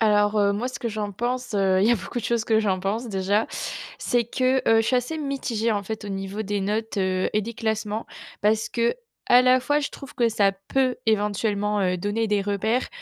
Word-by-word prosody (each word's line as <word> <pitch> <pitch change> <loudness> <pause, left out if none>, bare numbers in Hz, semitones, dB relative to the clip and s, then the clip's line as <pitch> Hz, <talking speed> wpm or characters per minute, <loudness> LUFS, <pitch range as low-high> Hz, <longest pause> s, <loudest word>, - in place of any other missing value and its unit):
Alors, 210 -1 +3
heu, 200 -1 +3
moi, 225 +5 -2
ce 255 -1 -6
que 235 - -2
j'en 210 -2 -3
pense, 245 +3 -3
heu, 190 -2 +3
il 200 - +4
y - - +5
a - - +6
beaucoup 215 +3 -5
de 230 - -5
choses 235 -1 0
que 220 -1 +3
j'en 190 -4 0
pense 215 +6 -2
déjà, 200 +2 +1 0.5
c'est 240 -1 +1
que 255 +3 +1
heu, 225 0 +6
je - - -3
suis 255 - +3
assez 250 +6 -2
mitigée, 260 -6 -1
en 205 -1 -1
fait, 220 +2 -6
au - - -5
niveau 195 +2 -4
des 205 -1 -2
notes, 215 +3 -2
heu, 185 -1 0
et 210 - +2
des 230 +3 -6
classements 220 0 -2 0.4
parce 215 +1 +2
qu'à 235 0 +1 0.5
la 255 0 +5
fois, 290 +3 +1
je 290 - -2
trouve 275 - -11
que 235 -1 +2
ça 205 -3 +2 0.2
peut 260 -2 +1
éventuellement, 210 -1 +1
heu, 180 -1 +1
donner 205 +5 -1
des 205 -1 +1
repères, 210 +5 0
215 Hz, 225 wpm, -24 LUFS, 205-235 Hz, 0.5 s, a